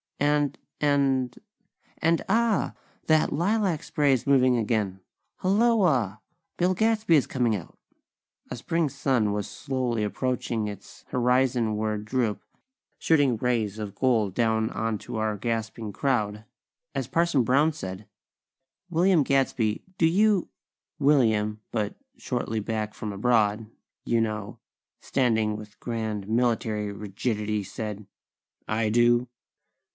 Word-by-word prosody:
And 145 0 +1 0.2
and 135 -4 +1 0.6
and, 165 0 +2
ah! 230 -3 +2 0.3
That 155 -1 +3
lilac 180 0 +1
spray 145 -2 +2
is 130 - -1
moving 130 -3 +4
again! 105 -4 -1 0.4
Hulloa! 185 - +2 0.4
Bill 180 +1 +2
Gadsby 220 -3 +2
is 145 - +3
coming 120 -4 +1
out!! 90 - -8 0.7
A - - -4
Spring 165 +5 0
sun 130 -5 +1
was 105 0 -2
slowly 125 -5 -2
approaching 115 -1 -2
its 100 -1 -10
horizonward 120 -4 +1
droop, 115 -2 -1 0.6
shooting 145 -7 +3
rays 110 -4 0
of 105 -2 -5
gold 110 -4 +1
down 110 0 +1
onto 110 0 -3
our 110 -1 -1
gasping 115 -1 -3
crowd, 110 -6 -1 0.5
as 135 -3 -2
Parson 165 -2 +2
Brown 140 +6 +3
said: 95 -8 -7 0.8
"William 175 0 +3
Gadsby, 130 -6 +1 0.2
do 165 - +5
you...?" 200 +2 +3 0.5
William, 110 -7 +2
but 105 -3 -2 0.2
shortly 120 - -2
back 110 0 -3
from 105 -2 -5
abroad, 110 0 +2 0.4
you 115 - +2
know, 110 -2 -2 0.4
standing 110 -5 +1
with 105 -1 -12
grand, 110 -4 -3
military 110 -2 0
rigidity, 105 +1 -2
said: 105 0 -6 0.6
"I 110 0 0
do." 120 +2 +3
120 Hz, 115 wpm, -26 LUFS, 105-140 Hz, 0.8 s, do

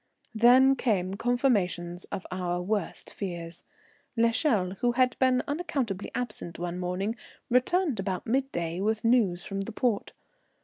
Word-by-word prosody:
Then 250 +4 +6
came 190 -8 0
confirmations 200 -7 0
of 190 - -6
our 180 -1 -2
worst 200 0 -3
fears. 170 -3 -6 0.5
L'Echelle, 230 - +2
who 240 -1 +2
had 255 0 +3
been 255 -1 +3
unaccountably 280 - -2
absent 215 -8 -4
one 175 +1 -4
morning, 185 +5 -2 0.4
returned 265 - +2
about 190 -1 -2
midday 220 -10 -1
with 220 +3 0
news 210 -8 +3
from 195 0 -3
the 195 - -5
port. 230 -2 -1
215 Hz, 130 wpm, -28 LUFS, 180-250 Hz, 0.5 s, Then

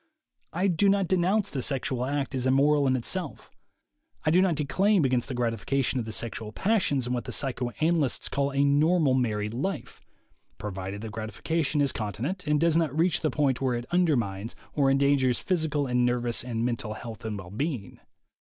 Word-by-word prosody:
I 180 +4 -1
do 195 +2 +3
not 195 -2 +2
denounce 185 +3 +1
the 135 - -2
sexual 130 -1 0
act 140 +1 -2
as 130 -1 -1
immoral 140 +2 +3
in 130 - +3
itself. 155 +6 -2 0.7
I 155 - +3
do 180 +3 +5
not 185 -4 +2
declaim 175 +5 +2
against 125 -2 +1
the 130 - -4
gratification 125 +3 0
of 115 - -3
the 110 - -6
sexual 110 -1 -2
passions 175 - +1
in 125 - -2
what 120 - -3
the - - -5
psychoanalysts 135 +3 0
call 140 0 0
a 140 +1 +2
"normal 150 +1 +3
married 110 -4 0
life," 190 +11 -4 0.6
provided 95 0 -5
that 110 -1 -6
grati 110 -1 -6
fication 155 -3 0
is 140 - +2
continent, 120 - -4
and 150 0 +2
does 165 0 +3
not 160 -3 +1
reach 170 +1 +2
the 155 - +1
point 140 -4 0
where 130 -2 +1
it 120 0 -4
undermines 120 - 0 0.2
or 140 -2 +2
endangers 135 -2 +3
physical 155 -5 0
and 125 -1 +1
nervous 120 -1 +1
and 115 -2 -2
mental 115 -3 -3
health 115 -1 -9
and 110 -2 -4
well 90 -2 -9
being. 120 - -4
135 Hz, 185 wpm, -27 LUFS, 120-155 Hz, 0.7 s, do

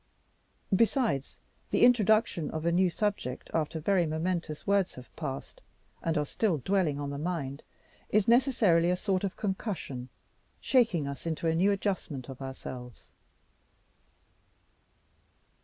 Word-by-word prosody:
Besides 200 - +1 0.3
the - - +2
introduction 220 -8 +3
of 155 +1 -4
a 170 - +3
new 180 +1 +3
subject 195 - -3
after 160 0 -1
very 175 +1 +2
momentous 160 0 -2
words 200 -2 +2
have 125 -1 -13
passed, 135 0 -6 0.4
and 165 -1 0
are 150 - +1
still 185 +2 0
dwelling 165 -1 +1
on 140 -1 -3
the 140 - -4
mind, 150 -4 -3 0.5
is 210 -1 +2
necessarily 230 -9 +4
a 180 - +3
sort 190 0 -1
of 195 - -3
concussion, 185 - -3 0.5
shaking 220 - +2
us 140 +4 -6
into 160 0 -2
a 160 - +3
new 185 +5 +3
adjustment 185 - -2
of 135 0 -9
ourselves. 130 -2 -8
170 Hz, 130 wpm, -30 LUFS, 145-200 Hz, 0.5 s, necessarily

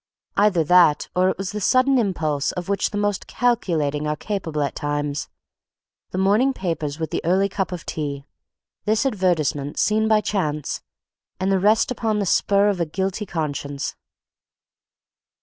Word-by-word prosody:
Either 200 -5 +3
that, 170 -2 +4
or 185 +1 +3
it - - -2
was 195 -1 -4
the 210 0 -4
sudden 255 +5 +4
impulse 155 -9 0
of 180 -1 -5
which 200 0 0
the 205 - -4
most 205 -1 -1
calculating 155 - 0
are 150 - 0
capable 160 -4 -3
at 140 - -2
times; 145 0 -3 0.8
the - - -5
morning 210 +8 +3
papers 160 - -3
with 160 -1 -4
the - - -2
early 185 +4 +3
cup 190 -1 -3
of 180 -2 -6
tea, 140 -3 -4 0.6
this 215 +4 +2
advertisement 165 - 0
seen 220 +1 +2
by 215 -1 +4
chance, 155 -8 -2 0.6
and 190 +1 0
the 190 - +3
rest 215 +5 +3
upon 225 -3 -1
the 205 - 0
spur 200 +2 +3
of 200 -3 0
a - - +2
guilty 190 +5 -2
conscience. 145 -4 -3
185 Hz, 160 wpm, -22 LUFS, 150-205 Hz, 0.8 s, that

